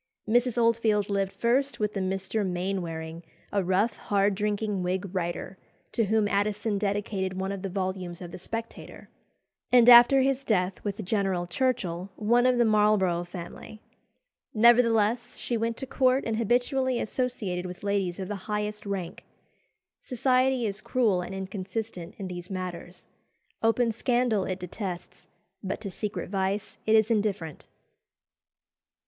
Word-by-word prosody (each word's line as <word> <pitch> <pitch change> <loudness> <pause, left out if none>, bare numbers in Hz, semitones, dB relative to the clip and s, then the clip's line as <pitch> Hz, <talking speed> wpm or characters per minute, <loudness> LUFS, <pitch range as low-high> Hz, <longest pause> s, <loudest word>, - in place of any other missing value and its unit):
Mrs. 245 +2 +2
Oldfield 225 -3 +2
lived 195 -1 -1
first 265 +4 +1
with 210 -1 -1
a - - -1
Mr. 190 +3 -1
Maynwaring, 175 -3 -3 0.3
a 200 -1 +1
rough, 195 +5 +1
hard 200 0 +1
drinking 210 0 -1
Whig 180 +2 -1
writer, 180 +1 -3 0.3
to 230 - +1
whom 215 +1 +2
Addison 205 +1 0
dedicated 200 -2 -1
one 190 +1 -2
of 195 -1 -5
the 195 - -3
volumes 185 -2 -3
of 175 -2 -8
the - - -8
Spectator; 225 +5 -7 0.6
and 245 -1 +6
after 245 +3 +9
his 270 0 +1
death 190 -6 0
with 205 0 -4
General 190 -3 0
Churchill, 190 -4 -1
one 240 +4 +3
of 250 -1 +3
the 240 - +4
Marlborough 210 -5 +3
family. 175 +4 -9 0.8
Nevertheless, 235 0 +4
she 240 - -2
went 230 0 -1
to 265 - -5
court 260 0 +2
and 225 -1 -1
habitually 245 +2 +1
associated 210 -7 -2
with 180 +2 -9
ladies 200 -3 -1
of 190 - -4
the 200 0 -7
highest 210 0 -3
rank. 190 -4 -4 0.8
Society 255 0 +1
is 205 0 -3
cruel 220 -8 +1
and 185 +2 -6
inconsistent 190 -1 -5
in 195 - -5
these 175 -1 -7
matters. 180 -2 -6 0.6
Open 230 +1 +2
scandal 235 -3 +1
it 185 - -3
detests, 180 0 -7 0.4
but 195 0 -3
to 200 -3 -5
secret 195 -2 -4
vice 195 +1 -2
it 220 - +5
is 220 +1 +4
indifferent. 200 -8 -1
205 Hz, 145 wpm, -27 LUFS, 185-230 Hz, 0.8 s, after